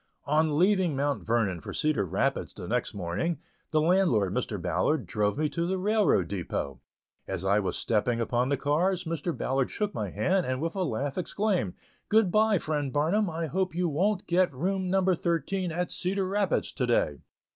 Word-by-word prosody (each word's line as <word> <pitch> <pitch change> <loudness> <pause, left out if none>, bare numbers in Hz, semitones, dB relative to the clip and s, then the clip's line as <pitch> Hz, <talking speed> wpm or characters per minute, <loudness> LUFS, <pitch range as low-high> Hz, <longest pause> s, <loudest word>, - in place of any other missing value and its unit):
On 150 0 +2
leaving 185 -3 +3
Mount 140 +1 -1
Vernon 110 -6 0
for - - -7
Cedar 150 -10 +1
Rapids 115 +10 -1
the 90 -4 -7
next 120 -1 -1
morning, 100 - -2 0.3
the 155 - +2
landlord, 155 - +3
Mr. 115 -4 -2
Ballard, 95 - 0
drove 105 +5 0
me 155 0 +1
to 170 +2 -2
the 190 +1 0
railroad 210 +2 +2
depot. 85 -7 -4 0.5
As 95 -1 -3
I 100 +2 +3
was 100 - -2
stepping 115 +2 +1
upon 120 +2 0
the 140 - +1
cars, 175 +6 +1
Mr. 165 0 -2
Ballard 135 0 0
shook 210 -2 -2
my - - -3
hand, 185 -1 +1
and 130 0 -1
with 165 +4 -2
a 195 - -1
laugh 140 -1 -2
exclaimed: 185 - -1 0.3
"Good 215 -4 +4
by, 215 0 +4
friend 150 -4 -2
Barnum, 170 +8 +1
I 165 0 -3
hope 185 +2 -1
you 180 0 +1
wont 190 +6 0
get 180 +1 +2
room 185 +7 -1
number 190 0 +3
thirteen 170 +2 -1
at 175 +2 -2
Cedar 190 +1 -1
Rapids 200 0 0
to - - -2
day." - - +1
160 Hz, 185 wpm, -28 LUFS, 125-185 Hz, 0.5 s, Good